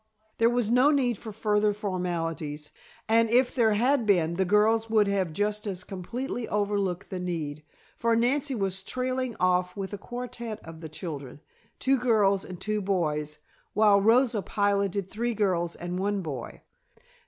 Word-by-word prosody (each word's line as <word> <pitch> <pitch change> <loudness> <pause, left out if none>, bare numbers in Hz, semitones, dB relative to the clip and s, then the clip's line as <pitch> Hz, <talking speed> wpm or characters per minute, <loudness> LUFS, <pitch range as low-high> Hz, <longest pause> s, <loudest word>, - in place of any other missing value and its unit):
There 230 0 +5
was 240 -2 0
no 250 +4 +5
need 255 -7 +1
for 225 - -7
further 210 0 +1
formalities, 165 -6 -3 0.4
and 225 +1 +4
if 245 +2 +3
there 225 -4 +3
had 245 +2 +2
been 170 -5 +3
the 190 +2 +1
girls 220 +3 +3
would 215 -2 +4
have 195 -4 0
just 210 +4 -1
as 185 -2 -4
completely 235 +6 -5
overlooked 200 -2 -1
the 185 - -3
need, 160 -5 -4 0.4
for 230 0 +2
Nancy 265 +4 +1
was 195 -3 -1
trailing 255 +2 -2
off 180 +1 +1
with 195 0 -4
a 205 - -5
quartette 240 -1 -6
of 165 0 -10
the 160 - -7
children, 150 -5 -7 0.4
two 270 0 +2
girls 210 -5 +3
and 180 -2 -9
two 215 +2 -1
boys, 150 -6 -1 0.4
while 205 -2 +5
Rosa 230 +1 +4
piloted 200 -1 0
three 235 +3 -2
girls 180 -5 0
and 175 +1 -4
one 200 +1 0
boy. 135 -7 -6
205 Hz, 160 wpm, -27 LUFS, 180-230 Hz, 0.4 s, There